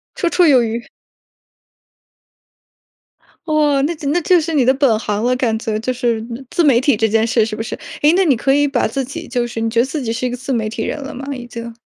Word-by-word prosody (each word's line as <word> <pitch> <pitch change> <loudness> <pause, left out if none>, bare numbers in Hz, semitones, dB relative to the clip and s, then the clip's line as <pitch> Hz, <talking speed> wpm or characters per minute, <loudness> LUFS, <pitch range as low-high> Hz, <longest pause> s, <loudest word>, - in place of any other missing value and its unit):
绰 345 - 0
绰 350 -1 +3
有 260 -4 +6
余。 230 +1 -3 2.7
哦， 295 -3 +2
那 340 - -3
就 300 -2 -6
那 345 +4 +1
就 355 +2 +4
是 325 +1 -3
你 285 -4 +3
的 255 - +4
本 260 -6 +2
行 210 -1 -2
了， 250 +1 +2
感 235 -3 0
觉 220 -1 -3
就 255 +3 -2
是 235 -3 -1 0.3
自 345 - +1
媒 265 -6 +5
体 270 -1 +2
这 220 +1 +1
件 220 +1 +2
事 230 -1 +2
是 215 -1 -5
不 225 - -4
是？ 230 - -5 0.3
哎， 300 - +6
那 385 - +4
你 280 -6 +4
可 270 +4 +1
以 290 +1 +3
把 265 -5 0
自 270 +5 -2
己 320 +6 -7
就 240 -1 -1
是 230 - -6
你 225 - 0
觉 230 +1 0
得 240 - +4
自 290 +2 -4
己 225 -3 -2
是 230 +2 -3
一 - - -2
个 250 - -5
自 265 +1 -4
媒 220 -3 -1
体 220 0 -4
人 300 - -3
了 280 +1 -7
吗？ 265 +2 -7
已 250 -3 -7
经。 235 0 -7
250 Hz, 275 characters per minute, -18 LUFS, 230-290 Hz, 2.7 s, 有